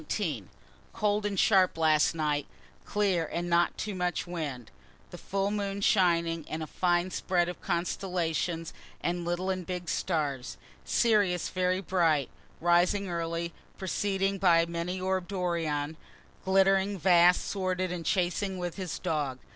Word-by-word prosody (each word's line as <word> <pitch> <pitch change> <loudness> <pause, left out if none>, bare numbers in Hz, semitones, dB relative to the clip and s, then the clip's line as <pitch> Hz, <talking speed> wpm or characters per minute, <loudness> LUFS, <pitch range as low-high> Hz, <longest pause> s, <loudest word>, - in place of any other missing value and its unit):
_ 155 - -1 0.5
Cold 210 0 +1
and 200 -2 -2
sharp 190 -5 +4
last 155 -1 +3
night 150 -2 -1 0.4
clear 195 -5 +1
and 175 +1 -2
not 170 0 +3 0.2
much 180 -3 -2
wind 145 -10 -5 0.4
the - - -8
full 195 +1 -1
moon 200 -1 -2
shining, 170 -5 +2
and 160 +1 -3
a - - -3
fine 175 +3 0
spread 175 -2 +1
of 180 - -6
constellations 170 -2 -2 0.3
and 175 0 -1
little 175 +2 -1
and 185 -2 -4
big 180 -1 -4
stars 145 -8 -2 0.3
Sirius 205 -7 +2
very 185 0 0
bright, 165 -6 +1 0.3
rising 175 +3 +2
early, 170 0 -3 0.2
preceded 195 +1 -1
by 170 -3 +5
many 170 +2 -3
orb'd 185 0 -1
Orion, 160 -5 -1 0.5
glittering, 195 +1 +3
vast, 175 0 +5
sworded, 185 -2 -1
and 175 -2 -4
chasing 185 +3 0
with 175 0 -4
his 185 -3 -4
dog. 150 -7 -2
175 Hz, 135 wpm, -29 LUFS, 165-190 Hz, 0.5 s, by